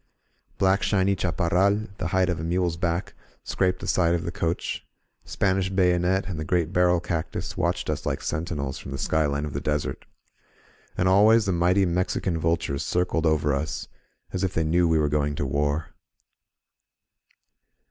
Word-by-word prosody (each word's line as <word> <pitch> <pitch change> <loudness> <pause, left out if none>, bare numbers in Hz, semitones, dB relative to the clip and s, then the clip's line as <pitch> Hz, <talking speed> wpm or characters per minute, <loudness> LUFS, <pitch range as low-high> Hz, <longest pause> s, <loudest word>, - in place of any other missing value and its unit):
Black 95 +1 +3
shiny 100 -1 +2
chaparral, 90 +5 +1
the 85 - -1
height 95 0 +2
of 90 -3 -1
a - - -4
mule's 85 0 0
back, 85 +1 -2 0.3
scraped 90 -1 0
the 100 - -5
side 85 -2 +2
of 85 - -2
the 85 - -4
coach; 85 0 -2 0.4
Span 95 -1 0
ish 95 -1 -1
bayonet 90 0 +2
and 90 -5 -4
the - - -2
great 85 +1 0
barrel 90 -1 +3
cactus 85 -2 -4
watched - - -1
us - - -2
like - - -2
sentinels 75 -4 -3
from - - -9
the - - -4
skyline 75 0 0
of 75 - -6
the 70 - -3
desert. 75 0 -2 0.9
And 90 - +2
al 95 +3 +5
ways 110 0 +5
the 95 - +1
mighty 90 +3 +3
Mexican 90 -1 -1
vultures 80 -4 0
circled 90 -2 0
over 75 -2 +2
us, 75 +3 -3 0.4
as 95 0 -2
if 95 - -1
they 80 - +2
knew 85 +2 +2
we 80 -1 +3
were 75 -1 +2
going 75 0 0
to 70 - -2
war. 75 +3 -1
85 Hz, 175 wpm, -25 LUFS, 80-95 Hz, 0.9 s, al